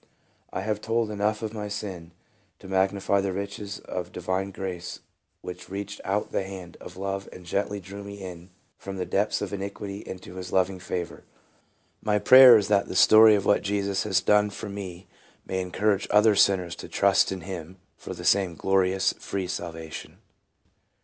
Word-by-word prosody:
I - - -3
have 105 +1 -2
told 115 -1 0
enough 105 +1 -1
of 110 0 -4
my 105 -2 -4
sin 95 -5 -6 0.5
to - - -13
magnify 95 +1 +1
the 95 -1 -2
riches 100 +1 -5
of 90 -1 -5
divine 95 +1 -2
grace 95 -2 -6 0.4
which 90 0 -8
reached 100 +1 -6
out 100 +2 -1
the - - 0
hand 95 -3 -8
of - - -10
love 95 0 -4
and 90 - -12
gently 100 +3 -2
drew 100 +2 -9
me 100 0 -8
in 90 -2 -9 0.3
from 95 0 -7
the 90 - -2
depths 105 +1 0
of 100 - -5
iniquity 100 0 -5
into 95 -2 -9
his 90 -1 -7
loving 95 0 +1
favor. 90 -1 -5 0.8
My 105 -1 +1
prayer 130 +2 +9
is, 105 - 0
that 100 -1 +2
the - - -6
story 110 +3 +8
of 100 - -1
what 100 - +3
Jesus 100 -1 -1
has 95 -2 +1
done 105 0 +3
for 100 +1 -7
me 95 -3 -7 0.4
may 95 0 -2
encourage 100 +3 0
other 105 0 +5
sinners 90 -3 +3
to - - -8
trust 100 -1 +3
in 95 -1 -4
him 90 0 -7 0.2
for - - -8
the - - -8
same 95 -4 +3
glorious, 95 +1 +2
free 95 -1 -3
salvation. 85 -3 -6
95 Hz, 175 wpm, -26 LUFS, 95-100 Hz, 0.8 s, prayer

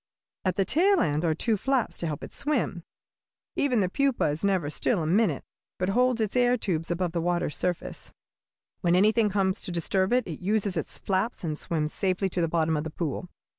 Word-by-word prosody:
At 185 -2 0
the 195 - +1
tail 375 - +3
end 150 +1 +1
are 160 -2 +2
two 220 +6 +1
flaps 265 +2 0
to 170 - -1
help 150 -2 -4
it - - -8
swim. 270 - -1 0.7
Even 250 -6 +2
the 185 - +2
pupa 275 +6 +1
is 150 +2 -3
never 190 -7 +1
still 175 +3 0
a - - -2
minute, 175 -2 +2 0.3
but 185 +1 -1
holds 250 +3 +2
its 215 0 -1
air 245 0 +4
tubes 165 -7 -1
above 175 0 -1
the 170 0 -1
water's 175 -3 0
surface. 180 -2 -3 0.7
"When 175 -1 +2
anything 215 +3 +4
comes 190 -1 0
to - - -4
disturb 185 +3 0
it, 250 -1 +3
it 160 -5 -6
uses 200 0 0
its - - -4
flaps 195 +4 -1
and 155 -3 -1
swims 155 -1 -2
safely 190 0 0
to 175 - -2
the 165 - +2
bottom 160 -1 +1
of 150 - -1
the 160 - -4
pool. 165 +3 -4
185 Hz, 210 wpm, -27 LUFS, 165-220 Hz, 0.7 s, air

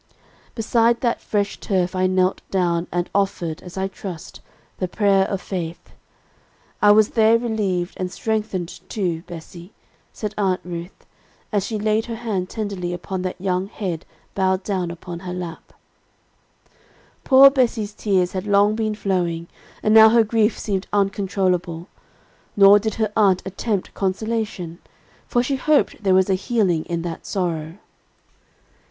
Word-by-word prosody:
'_ - - -37
"Beside 230 +1 +2
that 235 -2 0
fresh 205 -1 -1
turf 185 -2 -1
I 185 0 +2
knelt 185 0 +1
down, 175 -2 0
and 175 0 -1
offered, 180 -5 -1
as 180 +1 -11
I 190 0 0
trust, 185 -3 -8 0.4
the 185 - -1
prayer 195 0 +2
of 195 - -2
faith. 170 -3 -5 0.9
I 205 - +6
was 210 +1 +6
there 225 0 +4
relieved, 205 -6 -1
and 185 -1 -3
strengthened 210 -5 -3
too, 175 -6 -2
Bessie," 175 +2 -10 0.4
said 210 -1 -5
Aunt 190 -2 +1
Ruth, 175 +1 -8 0.5
as 205 -3 0
she 220 - -2
laid 215 +2 0
her 230 - -4
hand 210 -6 -3
tenderly 200 -5 -4
upon 180 +1 -4
that 185 0 -4
young 185 0 -1
head 185 -6 -4 0.3
bowed 190 0 +1
down 185 -4 -2
upon 170 0 -7
her 180 0 -6
lap. 175 -3 -7 1.5
Poor 275 0 +8
Bessie's 230 -6 0
tears 190 -4 +1
had 190 +2 -4
long 205 +1 +4
been 215 -1 -1
flowing, 175 -5 -1 0.4
and 215 - +3
now 220 0 +9
her 230 0 +5
grief 220 0 +1
seemed 195 -3 -3
uncontrollable. 190 -4 0 0.7
Nor 200 +1 +8
did 220 0 -3
her 215 -2 -1
aunt 195 -4 +3
attempt 195 +1 -3
consolation; 195 -3 -3 0.5
for 240 - +1
she 270 +2 -1
hoped 300 -2 +1
there 190 -2 +3
was 190 0 +4
a 195 - +2
healing 185 -4 0
in 170 -1 -3
that 170 -2 -6
sorrow. 165 -3 -3
195 Hz, 150 wpm, -22 LUFS, 180-215 Hz, 1.5 s, now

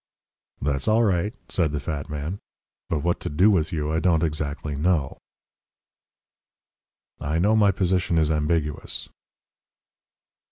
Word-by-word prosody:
"That's 70 -1 -1
all 110 +2 +4
right," 100 -1 +1 0.2
said 80 -5 0
the 75 - -1
fat 75 -2 -4
man. 75 +6 -4 0.5
"But 75 -3 -1
what 85 +1 +1
to - - -4
do 90 +9 +4
with 85 -4 +1
you 75 -2 -2
I 80 - +1
don't 85 -2 +2
exactly 75 -1 -2
know." 75 -2 0 2.0
"I 75 +3 -1
know 105 +6 +3
my 105 -2 +5
position 90 -2 +1
is 80 -1 +3
ambiguous." 75 0 -1
80 Hz, 130 wpm, -24 LUFS, 75-90 Hz, 2.0 s, my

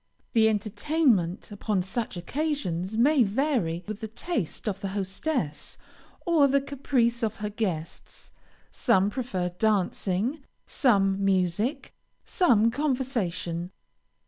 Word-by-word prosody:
The 220 -1 +5
entertainment 215 - +1
upon 205 -2 -1
such 190 +1 -4
occasions, 220 - -2
may 280 +4 +4
vary 210 - 0
with 215 -1 -5
the 220 - -5
taste 225 - -4
of 195 -2 -1
the 195 - -3
hostess, 195 - -3 0.5
or 325 -5 +5
the 280 +1 +3
caprice 260 -4 0
of 220 -1 -1
her 210 -1 -4
guests. 180 -7 -5 0.4
Some 205 -5 +2
prefer 195 -8 -2
dancing, 205 - 0 0.2
some 195 -6 +2
music, 195 - 0 0.3
some 230 - +3
conversation. 235 - -2
215 Hz, 110 wpm, -27 LUFS, 190-260 Hz, 0.5 s, The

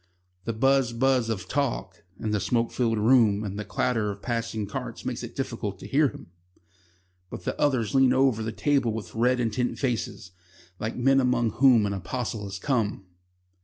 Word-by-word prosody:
The 115 - -1
buzz 135 +1 +2
buzz 125 -1 +2
of 95 -5 -3
talk 115 -8 -2 0.2
in 110 - -2
the 105 - +1
smoke 115 +4 0
filled 115 -3 0
room 110 -2 +4
and 100 0 -5
the - - -3
clatter 105 +2 0
of 100 0 -7
passing 115 -3 -2
carts 100 - -6
makes - - -3
it - - -8
difficult - - -4
to - - -11
hear 145 +2 +3
him, - - -11 1.0
but 90 - -8
the - - -2
others 125 -8 +1
lean 135 -1 +5
over 130 -3 +3
the 110 +1 -3
table 135 0 +1
with 105 -5 -6
red, 125 +3 +2
intent 120 +1 -1
faces, 115 -7 -3 0.5
like 110 +1 -3
men 135 +2 +3
among 125 -3 +1
whom 125 -3 +5
an 100 - -1
apostle 105 +3 -4
has 100 -1 -6
come. 110 -4 -1
115 Hz, 180 wpm, -26 LUFS, 105-130 Hz, 1.0 s, lean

